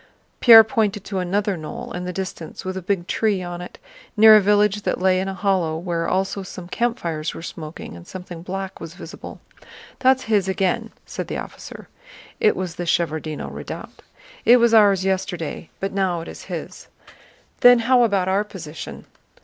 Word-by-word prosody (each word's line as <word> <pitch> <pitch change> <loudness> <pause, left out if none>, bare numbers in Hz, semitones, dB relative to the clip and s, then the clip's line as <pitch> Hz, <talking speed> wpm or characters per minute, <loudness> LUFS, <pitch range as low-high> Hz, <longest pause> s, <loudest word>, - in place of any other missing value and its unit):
Pierre 225 -2 +10
pointed 215 -4 -1
to 195 -3 -3
another 195 +2 0
knoll 155 -2 -7
in 180 0 -5
the 180 - -3
distance 185 -3 -6
with 185 0 -3
a 190 - -4
big 185 -1 -1
tree 205 -1 0
on 175 0 -6
it, 180 - -10 0.4
near 220 0 +9
a 215 - +7
village 210 +1 +3
that - - -2
lay 185 0 +3
in 190 - -2
a 195 - -4
hollow 180 -5 0
where 165 -1 -2
also 190 +1 -1
some 185 -2 -9
campfires 175 -8 -2
were - - -8
smoking 155 - -8
and 85 0 -12
something 180 -2 -8
black 190 +2 -6
was 165 +1 -9
visible. - - -10 0.6
"That's 260 0 +3
his 210 -5 +1
again," 190 +4 0 0.2
said - - -6
the - - -4
officer. - - -9 0.5
(It 215 - +3
was 180 -3 -5
the 175 - -3
Shevárdino 160 -3 -1
Redoubt.) - - -8 0.4
"It 245 - +7
was 235 -1 +3
ours 200 -4 +5
yesterday, 180 -4 -3
but 195 0 -3
now 185 -3 0
it 165 - -9
is - - -10
his." - - -7 0.7
"Then 245 0 +8
how 245 +2 +3
about 200 -6 +2
our 195 +2 +2
position?" 165 -7 -9
190 Hz, 180 wpm, -22 LUFS, 175-210 Hz, 0.7 s, Pierre